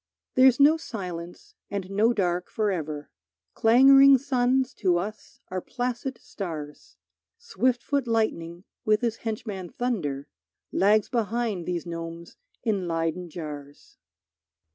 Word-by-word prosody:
There's 255 0 +5
no 300 +3 +6
silence 180 - -7 0.2
and 195 -2 -4
no 215 +4 +3
dark 180 -5 -1
forever, 160 -9 -2 0.4
Clangoring 270 +4 +7
suns 260 0 +1
to 180 -4 +2
us 205 +4 -6
are 185 0 -3
placid 250 +2 -3
stars; 155 -7 -8 0.4
Swift 255 - 0
foot 280 -3 -1
lightning 180 -7 -1 0.2
with 215 +1 +2
his 230 -2 -1
henchman 210 -5 -5
thunder 160 - -3 0.4
Lags 210 +2 +3
behind 225 -5 -1
these 175 -1 -2
gnomes 165 0 -7 0.3
in 200 -6 0
Leyden 165 +1 -2
jars. 145 -3 -9
205 Hz, 115 wpm, -26 LUFS, 170-245 Hz, 0.4 s, Clangoring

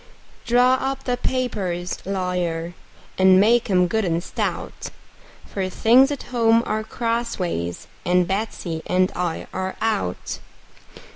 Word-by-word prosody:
Draw 250 +2 +4
up 270 0 -2
the 250 - 0
papers, 195 -10 -2
lawyer, 180 -3 -2 0.5
and 190 0 +7
make 235 +3 +4
'em 180 -2 +4
good 220 +5 0
and 170 -2 0
stout; - - -4 0.6
For 190 -2 -3
things 245 +8 +5
at 285 -2 -4
home 230 -1 +4
are 215 0 -1
crossways, 220 - -2 0.2
and 180 0 +2
Betsey 190 -5 -3
and 185 +1 +2
I 175 -2 -2
are 190 0 -3
out. 95 - -2
195 Hz, 125 wpm, -22 LUFS, 180-235 Hz, 0.6 s, and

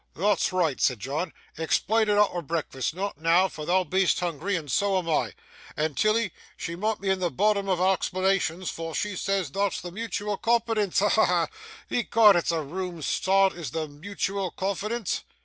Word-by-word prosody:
'Thot's 200 +3 +2
reeght!' 170 -7 0
said 125 -4 +2
John, 145 - -3 0.3
'explain 215 +7 +1
it 205 - +3
arter 200 -4 +3
breakfast, 155 -4 -3
not 190 -5 -4
noo, 170 +3 +4
for 155 -4 -8
thou 185 +1 +3
be'est 185 +2 +2
hoongry, 175 +3 -2
and 150 -5 -6
so 200 -1 +2
am 180 -2 -2
I; 160 - 0 0.4
and 150 -1 -1
Tilly 215 -2 +1 0.2
she 170 - -4
mun' 215 +4 -1
be 195 0 0
at 190 - 0
the 180 -1 0
bottom 200 +1 +1
o' - - +4
a' 185 +2 +3
explanations, 185 -2 0
for 165 -1 -6
she 210 -2 -2
says 195 -4 -1
thot's 200 +3 0
the 175 - -7
mutual 210 0 -3
confidence. 225 -4 +1
Ha, 205 - +3
ha, 220 - +4
ha! 175 -2 +2 0.4
Ecod, 225 -3 +5
it's 175 - +1
a 165 -2 -1
room 175 +1 -5
start, 195 +4 +3
is 165 -6 -6
the 160 +4 -3
mutual 195 +5 -3
confidence! 200 +4 -2
185 Hz, 185 wpm, -26 LUFS, 165-200 Hz, 0.4 s, Ecod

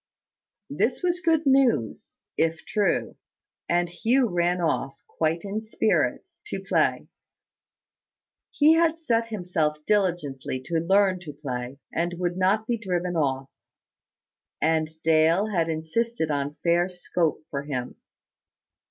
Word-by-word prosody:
This - - 0
was 355 0 +1
good 325 -3 +2
news, 265 - +2 0.2
if 160 0 0
true: 205 -5 0 0.5
and 175 0 +2
Hugh 240 +8 +1
ran 175 0 +1
off, 155 -5 -1
quite 160 +1 -1
in 205 +2 -3
spirits, 220 0 -1
to - - -4
play. - - 0 1.4
He 305 +2 +5
had 325 0 +3
set 230 -8 0
himself 175 -8 -1
diligently 170 -11 0
to 165 -1 0
learn 190 +2 +3
to 160 -4 -9
play, 130 -2 -5 0.2
and 175 +1 -1
would 175 0 -1
not 195 +4 +2
be 235 0 -1
driven 180 -4 -2
off; 135 -4 -1 1.1
and 160 0 +1
Dale 165 +6 +3
had 165 -4 +1
insisted 160 +3 -1
on 145 0 -2
fair 175 +1 +3
scope 175 -3 -2
for 140 - -2
him. 130 -4 -5
175 Hz, 125 wpm, -25 LUFS, 155-215 Hz, 1.4 s, He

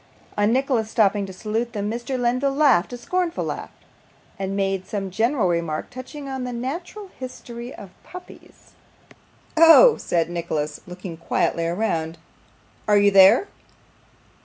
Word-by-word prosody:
On 205 +1 +2
Nicholas 250 -3 0
stopping 205 -2 +2
to - - -8
salute 225 +5 -3
them, 205 -2 -3
Mr. 240 +3 -4
Lenville 255 +3 0
laughed 275 - +3
a 245 - -6
scornful 355 +7 -2
laugh, - - -5 0.7
and 195 0 -3
made 195 -1 -1
some 195 -2 -4
general 225 +2 +1
remark 170 -3 -2
touching 255 +3 -9
the 265 -2 -4
natural 340 - -6
history 245 -1 -8
of 195 - -11
puppies. 365 0 -14 0.8
'Oh!' 330 +9 +8
said 170 -2 0
Nicholas, 155 -3 -4
looking 180 -1 -8
quietly 165 0 -1
round, 170 -3 -2 0.7
'are 210 -1 +5
you 200 0 +4
there? 195 - +6
220 Hz, 135 wpm, -23 LUFS, 190-260 Hz, 0.8 s, Oh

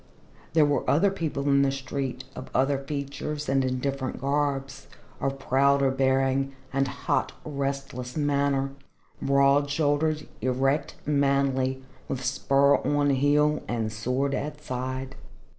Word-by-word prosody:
There 160 -2 +5
were 145 -2 0
other 190 +7 +4
people 160 -7 -3
in 140 0 +4
the 140 -1 +3
street, 135 -1 -4
of 130 - -8
other 135 +1 +2
features 145 +1 -4
and 135 0 +2
in 130 0 0
different 135 0 -3
garbs, 140 -1 -1 0.3
of 135 0 -1
prouder 135 +1 +3
bearing 135 0 +1 0.2
and 135 0 +2
hot, - - -1
restless 140 -3 -4
manner, 140 -2 +1 0.5
broad 140 +1 +3
shouldered, 150 +1 +1
erect, 135 +3 0
manly, 140 -2 +1 0.2
with 130 -1 -3
spur 140 +1 +3
on 145 -1 +1
heel 145 +2 +3
and 110 -2 -2
sword 125 +5 -1
at 150 +1 -4
side. 130 +1 -4
140 Hz, 125 wpm, -26 LUFS, 130-145 Hz, 0.5 s, There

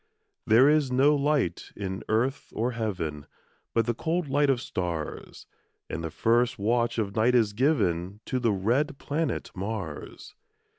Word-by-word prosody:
There 120 +4 +6
is 150 -3 +3
no 140 +4 +4
light 145 - 0
in 95 -1 -4
earth 125 +6 0
or 120 +3 0
heaven, 90 - -3 0.5
But 115 -1 +3
the 120 - 0
cold 165 +6 -1
light 145 +1 +2
of 130 -3 +3
stars; 85 -8 -5 0.5
And 85 - -4
the 80 - -3
first 120 +8 +2
watch 115 +3 +1
of 100 -3 -2
night 115 +3 +3
is 110 -4 +3
given 100 - +1
To 130 - -1
the 120 -3 +2
red 125 +10 0
planet 155 +4 -2
Mars. 95 -5 -6
115 Hz, 150 wpm, -27 LUFS, 100-135 Hz, 0.5 s, There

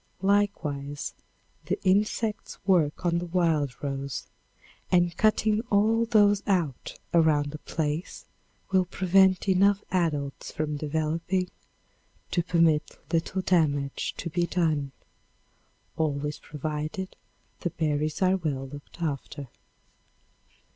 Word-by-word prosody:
Likewise, 155 -9 0 0.5
the - - -1
insects 210 +3 +1
work 175 -4 +2
on 170 0 +2
the 175 - -5
wild 160 -8 0
rose, 140 -1 -3 0.7
and 175 -1 +3
cutting 215 0 +3
all 220 +3 +3
those 205 -3 +4
out 170 - -1 0.2
around 155 -3 +3
a 150 - -6
place 155 +2 -3 0.5
will 190 -1 +4
prevent 190 +1 +3
enough 195 +1 +4
adults 150 -6 -1
from 150 -1 -2
developing 160 +5 -1 0.8
to 175 - +2
permit 165 -3 +2 0.2
little 170 +3 0
damage 145 -7 +1
to - - -4
be 175 +1 +1
done, 155 -6 0 1.0
always 150 -1 -1
provided 155 +5 -4 0.4
the 175 - -1
berries 155 +1 -1
are 185 +1 +4
well 140 -6 -3
looked 145 +4 -9
after. 140 -3 -4
165 Hz, 105 wpm, -27 LUFS, 150-185 Hz, 1.0 s, those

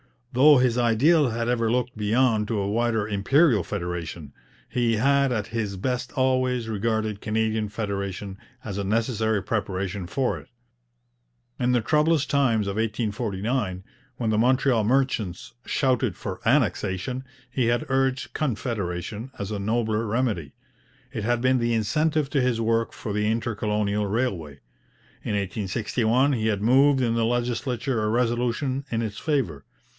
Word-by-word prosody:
Though 145 +4 +7
his 125 -1 +2
ideal 125 +6 +4
had 115 +1 -2
ever 115 -2 +1
looked 125 +1 0
beyond 110 0 +2
to 115 - -1
a 100 - -1
wider 110 0 0
Imperial 110 - +3
federation, 85 -4 -5 0.3
he 120 -2 +1
had 140 +4 +3
at 110 -4 -1
his 110 -3 -3
best 125 +5 -2
always 130 -3 +1
regarded 110 -1 -1
Canadian 110 0 0
federation 100 -2 -4 0.3
as 100 -2 -5
a - - -1
necessary 110 0 0
preparation 100 -3 -2
for 130 +7 -1
it. - - -16 1.1
In 125 0 +2
the 120 - +3
troublous 150 +4 +2
times 120 -7 +2
of 100 +1 -3
1849, 110 -2 -2 0.3
when 115 -3 -2
the 110 - +1
Montreal 125 -2 +3
merchants 115 -7 0
shouted 130 -3 +1
for 95 -3 -6
Annexation, 120 -1 +1 0.3
he 130 -2 0
had 120 +5 +1
urged 135 0 0
Confederation 110 - -3
as 100 +1 -5
a 105 - -2
nobler 110 +1 0
remedy. 105 - -1 0.6
It 105 - -4
had 120 0 +1
been 130 0 +3
the 120 0 +1
incentive 150 +7 +1
to 140 - +2
his 125 -2 +1
work 115 0 +1
for 110 - -6
the 105 +1 0
inter 115 +1 0
colonial 105 0 -1
railway. 95 - -2 0.6
In 105 - -2
1861 110 +6 0
he 110 -3 0
had 105 -2 0
moved 135 +3 +5
in 115 -2 +1
the 115 -1 +2
legislature 120 0 -1
a 105 - 0
resolution 125 +3 0
in 115 0 -1
its 110 -1 -4
favour. 135 - -1
115 Hz, 150 wpm, -25 LUFS, 105-125 Hz, 1.1 s, Though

